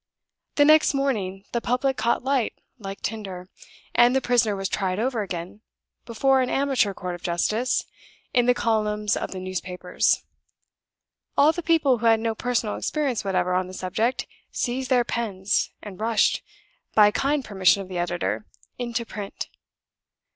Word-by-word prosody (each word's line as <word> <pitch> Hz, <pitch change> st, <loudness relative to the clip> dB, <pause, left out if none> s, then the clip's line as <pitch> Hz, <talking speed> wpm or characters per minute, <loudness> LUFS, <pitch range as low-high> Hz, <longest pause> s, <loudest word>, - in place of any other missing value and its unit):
The 290 Hz, -, +5 dB
next 310 Hz, -1 st, +5 dB
morning 200 Hz, -9 st, -1 dB
the 235 Hz, -, -1 dB
public 255 Hz, +3 st, 0 dB
caught 235 Hz, 0 st, 0 dB
light 265 Hz, -3 st, +1 dB, 0.3 s
like 195 Hz, -2 st, -7 dB
tinder; 190 Hz, -5 st, -5 dB, 0.5 s
and 240 Hz, +2 st, +5 dB
the -, -, +4 dB
prisoner 240 Hz, -5 st, +2 dB
was 195 Hz, 0 st, -2 dB
tried 190 Hz, -2 st, -1 dB
over 235 Hz, 0 st, 0 dB
again, 180 Hz, +1 st, -6 dB, 0.5 s
before 265 Hz, +3 st, +3 dB
an 250 Hz, -, 0 dB
amateur 270 Hz, -8 st, +1 dB
court 180 Hz, 0 st, -4 dB
of 175 Hz, -, -8 dB
justice, 215 Hz, +8 st, 0 dB, 0.5 s
in 245 Hz, -2 st, +3 dB
the 250 Hz, -, +5 dB
columns 210 Hz, -3 st, 0 dB
of -, -, -3 dB
the 190 Hz, -, -6 dB
newspapers. 185 Hz, -1 st, -1 dB, 1.1 s
All 290 Hz, +2 st, +6 dB
the 345 Hz, -, -4 dB
people 310 Hz, -7 st, +3 dB
who 230 Hz, -, +1 dB
had 225 Hz, -1 st, +5 dB
no 225 Hz, 0 st, -1 dB
personal 230 Hz, -2 st, -1 dB
experience 285 Hz, -6 st, -1 dB
whatever 185 Hz, -2 st, 0 dB
on 185 Hz, 0 st, +1 dB
the 185 Hz, -, -9 dB
subject 220 Hz, +8 st, -1 dB, 0.3 s
seized 255 Hz, +1 st, -2 dB
their 250 Hz, -2 st, +4 dB
pens, 205 Hz, -5 st, -1 dB
and 205 Hz, -3 st, -9 dB
rushed 220 Hz, 0 st, +2 dB, 0.5 s
(by 210 Hz, -1 st, +7 dB
kind 280 Hz, +4 st, 0 dB
permission 195 Hz, -1 st, +3 dB
of -, -, -12 dB
the 185 Hz, -1 st, -4 dB
editor) 115 Hz, -, -2 dB, 0.3 s
into 235 Hz, -1 st, -2 dB
print. 205 Hz, -3 st, -6 dB
220 Hz, 155 wpm, -25 LUFS, 190-250 Hz, 1.1 s, by